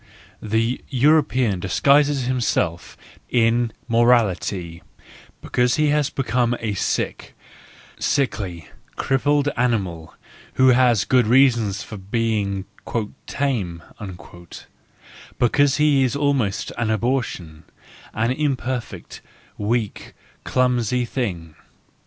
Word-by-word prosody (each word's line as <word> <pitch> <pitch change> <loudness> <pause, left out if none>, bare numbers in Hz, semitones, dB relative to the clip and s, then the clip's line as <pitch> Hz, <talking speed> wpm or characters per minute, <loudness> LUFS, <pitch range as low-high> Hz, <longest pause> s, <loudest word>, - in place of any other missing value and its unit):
The 115 +3 -1
European 130 - +2
disguises 140 +9 +3
himself 115 -9 -1 0.3
in 120 0 +2 0.2
morality 105 -7 +1 0.6
because 125 0 +1
he 155 -1 +2
has 150 -1 +1
become 125 -2 0
a 110 -2 -2
sick, 100 - -3 0.6
sickly, 100 - -1 0.3
crippled 145 +2 +1
animal, 95 -10 -2 0.4
who 130 0 +5
has 125 -5 +4
good 125 -4 +3
reasons 115 -5 +3
for 105 - -9
being 100 -1 -2 0.3
" 115 +2 -4
tame," 100 -12 -2 1.5
because 135 +3 +3
he 150 -3 +3
is 125 -1 0
almost 140 -8 0
an 115 -2 0
abortion, 110 - -2 0.5
an 110 +3 +1
imper¬ 130 -3 -1
fect, - - -12 0.4
weak 110 0 -2
and - - -32
clumsy 125 -1 +1
thing. 90 - -4
120 Hz, 100 wpm, -22 LUFS, 100-130 Hz, 1.5 s, who